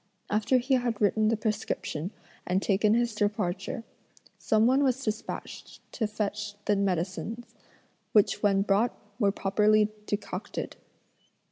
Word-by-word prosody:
After 220 +5 +3
he 255 +2 0
had 245 -4 +1
written 215 +1 +3
the 225 0 +2
prescription 210 -6 -2 0.4
and 180 +1 +2
taken 210 +2 +2
his 240 -1 +1
departure, 210 +3 -1 0.6
some 220 0 +3
one 265 +4 +4
was 265 0 +1
despatched 215 -1 -5
to 220 - -1
fetch 210 -1 -3
the 205 - +3
medicines, 200 +5 -2 0.6
which 205 -1 +3
when 195 -1 +3
brought 205 +4 +2 0.2
were 200 -4 +4
properly 210 +2 +3 0.2
decocted. 205 - -4
210 Hz, 125 wpm, -28 LUFS, 200-230 Hz, 0.6 s, one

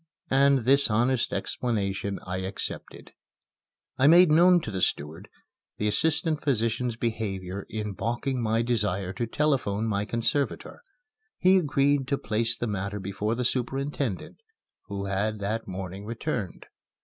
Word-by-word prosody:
And 135 0 +4
this 140 +1 +5
honest 120 +3 +1
explanation 100 -4 -2
I 90 0 -3
accepted. 95 +1 -6 0.9
I 135 - +5
made 170 +1 +7
known 175 +3 +6
to - - -5
the 95 -2 -3
steward 75 +1 -2 0.5
the 105 - 0
assistant 155 +6 +1
physician's 120 -2 0
behavior 100 -5 -3
in 105 -2 -4
balking 120 +5 -2
my 115 0 +1
desire 100 -6 -1
to 115 +4 -3
telephone 115 -7 0
my 105 -2 -1
conservator. 120 - -1 0.6
He 185 +1 +5
agreed 140 -3 +1
to 140 0 0
place 115 +1 0
the - - -2
matter 100 -1 -3
before 100 +3 -2
the 125 +1 -2
superintendent, 135 -2 -2 0.5
who 100 0 -4
had 100 +2 -1
that 105 +3 -3
morning 95 +1 -6
returned. 115 - -4
115 Hz, 135 wpm, -27 LUFS, 100-135 Hz, 0.9 s, made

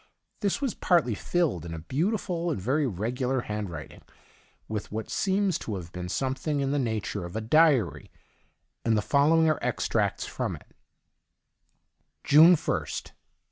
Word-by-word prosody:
This 200 +6 -1
was 270 -5 0
partly 165 -10 +2
filled, 140 - -1
in 85 -1 -6
a 80 0 -9
beautiful 175 - -1
and 155 - -2
veiy 135 +8 +1
regular 125 +6 -1
handwriting, 100 - -6 0.7
with 105 -2 -5
what 110 0 -5
seems 195 -1 +1
to 110 - -4
have 85 -3 -7
been 90 0 -6
something 135 - -1
in 135 -1 0
the 145 - +1
nature 110 -5 -2
of 85 +3 -8
a - - 0
diary, 130 - +3 0.7
and 115 -1 +2
the 105 - 0
fol 140 +5 +3
lowing 165 0 +4
are 155 - +2
extracts - - 0
from - - -3
it: - - -17 1.5
June 160 +5 +7
1st. - - -3
130 Hz, 150 wpm, -27 LUFS, 105-160 Hz, 1.5 s, June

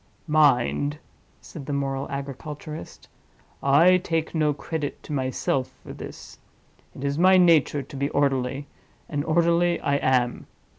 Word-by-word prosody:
"Mind!" 145 -1 +2 0.4
said 145 -5 -10
the 145 - -2
moral 135 -1 -2
agriculturist, 145 +3 -7 0.5
"I 165 +7 +5
take 165 -3 -2
no 155 -2 +2
credit 150 +1 -5
to - - -7
myself 130 -1 -1
for - - -9
this: - - -10 0.6
it 130 - -8
is 140 +2 -1
my 185 +1 +6
nature 160 -5 +4
to 140 +2 -12
be 140 +1 -1
orderly, 135 -1 0 0.4
and 145 -2 -2
orderly 170 +2 +2
I 140 0 +1
am. 125 -3 0
145 Hz, 135 wpm, -25 LUFS, 135-160 Hz, 0.6 s, my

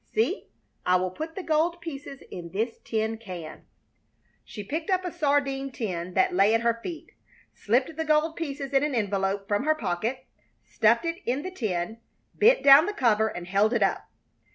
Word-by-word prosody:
See, 445 - 0 0.4
I 180 - +3
will 185 0 0
put 315 - -6
the 385 - -5
gold 330 +2 +1
pieces 285 -4 -8
in 170 -1 -7
this 225 +4 -2
tin 220 0 -2
can." 180 -7 -9 0.8
She 210 - -8
picked 315 - -4
up 370 -1 +1
a 360 - -3
sardine 280 -4 0
tin 185 -7 -4
that 185 - +3
lay 200 +4 +4
at 225 - +1
her 230 0 +1
feet, 330 +3 -7 0.4
slipped 255 +8 0
the 320 - -2
gold 310 +1 +2
pieces 280 -3 -5
in 270 - +4
an 295 -2 -1
envelope 195 -2 -1
from 205 +4 0
her 310 0 +3
pocket, 230 - -3 0.4
stuffed - - +2
it 335 0 -2
in 260 +4 0
the 370 - -5
tin, 220 - -3 0.3
bent 485 +4 +4
down 280 +3 +8
the 415 - -2
cover, 220 - +2
and 175 -5 -6
held 200 +5 +2
it 230 -4 +2
up. 195 - -1
255 Hz, 185 wpm, -26 LUFS, 205-310 Hz, 0.8 s, down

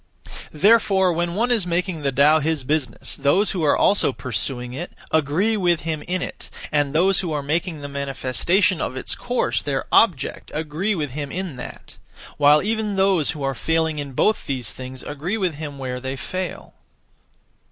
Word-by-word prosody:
Therefore 190 0 +4
when 170 +1 -1
one 240 +4 +1
is 220 -7 +2
making 175 -1 -1
the 140 -1 0
Tao 145 +4 +5
his 155 -2 -1
business, 135 -3 -2
those 175 +9 +3
who 180 -4 -2
are 145 - +4
also 200 -7 +3
pursuing 125 +1 -4
it, 170 +7 -6 0.2
agree 160 +9 +2
with 175 -5 +2
him 155 -1 -3
in 180 +1 -1
it, - - -7 0.2
and 145 -2 +1
those 190 +4 +4
who 175 -4 -2
are 145 -1 -2
making 160 +2 -2
the 145 - -5
manifestation 140 - 0
of 130 - -3
its - - -3
course 245 +1 -1
their 135 -2 -2
object 175 - +2
agree 160 +7 -1
with 150 -6 -3
him 140 +1 -5
in 185 -5 -4
that; 125 - -9 0.4
while 150 +1 +5
even 215 -1 -1
those 190 -5 +3
who 145 - -5
are 135 0 0
failing 160 +2 0
in 140 -2 -5
both 215 +11 +1
these 125 -6 -2
things 130 0 -8
agree 155 +9 -3
with 185 -5 0
him 145 -1 -7
where 130 -2 -4
they 130 +1 -4
fail. 185 +6 -5
155 Hz, 180 wpm, -22 LUFS, 140-185 Hz, 0.4 s, Tao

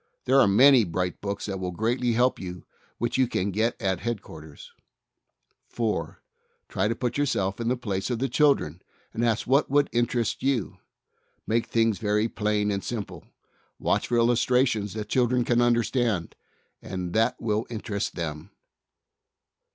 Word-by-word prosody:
There 135 +2 +4
are 100 - +5
many 125 +5 +6
bright 90 0 -3
books 100 0 -4
that 95 -2 -4
will 90 -1 -3
greatly 115 +6 0
help 125 +3 +2
you 90 -2 -7 0.3
which 120 +2 -1
you 130 - +4
can 100 -3 -1
get 110 +5 0
at 95 -2 -1
Headquarters. 80 -10 -7 1.0
4. 105 -9 -2 0.5
Try 95 - 0
to 115 - -1
put 125 +3 -2
yourself 100 -9 0
in 115 - -2
the 125 +1 +1
place 100 -4 -3
of 120 - -1
the 135 +4 -1
child, 145 +3 +3
and 85 +8 -8
ask 115 -1 +1
what 135 +4 +2
would 145 +1 +2
interest 120 0 0
you. 135 -6 -1 0.7
Make 115 +1 0
things 115 -3 +1
very 105 0 +1
plain 105 -2 0
and 100 -1 -2
simple. 110 -4 -6 0.5
Watch - - 0
for 120 - +1
illustrations 120 -2 +2
that 110 - -5
the - - -5
children 125 +2 +1
can 120 0 +2
under 120 -1 +3
stand, 115 -9 -1 0.5
and 90 -2 -5
that 115 +3 +1
will 110 -1 -1
interest 105 -3 -4
them. 80 +1 -5
115 Hz, 160 wpm, -26 LUFS, 100-120 Hz, 1.0 s, many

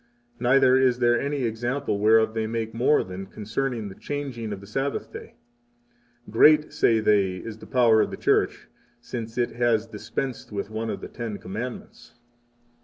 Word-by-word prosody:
Neither 130 +1 +4
is 130 -2 +3
there 120 -1 +3
any 140 -1 -2
example 120 -1 -2
whereof 110 +1 +4
they 110 -1 -1
make 115 -1 -3
more 125 +6 +3
than 95 +1 -8
concerning 110 +2 -3
the 95 - -8
changing 130 -4 -5
of 100 - -5
the 100 - -12
Sabbath 135 +7 -3
day. - - -10 0.9
Great, 150 +7 +5
say 115 -1 +3
they, 100 -3 +2
is 110 +3 -8
the - - -12
power 120 -4 +4
of - - 0
the - - -7
Church, - - +1 0.3
since 115 -1 -7
it 120 -1 +1
has 115 -2 +1
dispensed 115 +4 -5
with 100 0 -4
one 110 +1 -3
of - - -4
the - - -6
Ten 115 -4 -6
Commandments! 110 +8 -7
115 Hz, 170 wpm, -25 LUFS, 110-125 Hz, 0.9 s, Great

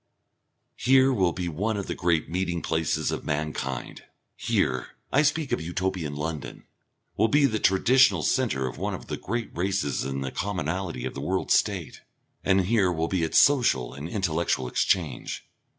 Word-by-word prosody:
Here 130 +1 +4
will 95 -7 +2
be 90 0 -4
one 100 +7 -1
of 100 - -3
the - - -3
great 85 -3 +1
meeting 85 -1 -2
places 80 -1 0
of - - -4
mankind. 75 -4 -3 0.3
Here 65 0 -1 0.2
I 145 - +5
speak 150 -1 0
of - - 0
Utopian 85 -2 -2
London 75 0 -5 0.5
will 110 - +4
be 145 +3 +4
the 110 -5 0
traditional 100 -2 +4
centre 65 -1 +1
of 60 - -7
one - - -2
of - - -10
the - - -3
great 115 +2 -4
races 95 -5 -1
in 70 0 -3
the 65 -1 -3
commonalty 90 -6 -3
of - - -4
the 70 - -6
World 95 +6 -1
State - - +1 0.4
and 95 0 +3
here 95 -1 +2
will 80 -1 -1
be 95 -2 0
its 80 - +1
social 120 - +4
and 70 +4 -7
intellectual 85 -9 0
exchange. 75 0 -1
90 Hz, 165 wpm, -26 LUFS, 75-100 Hz, 0.5 s, I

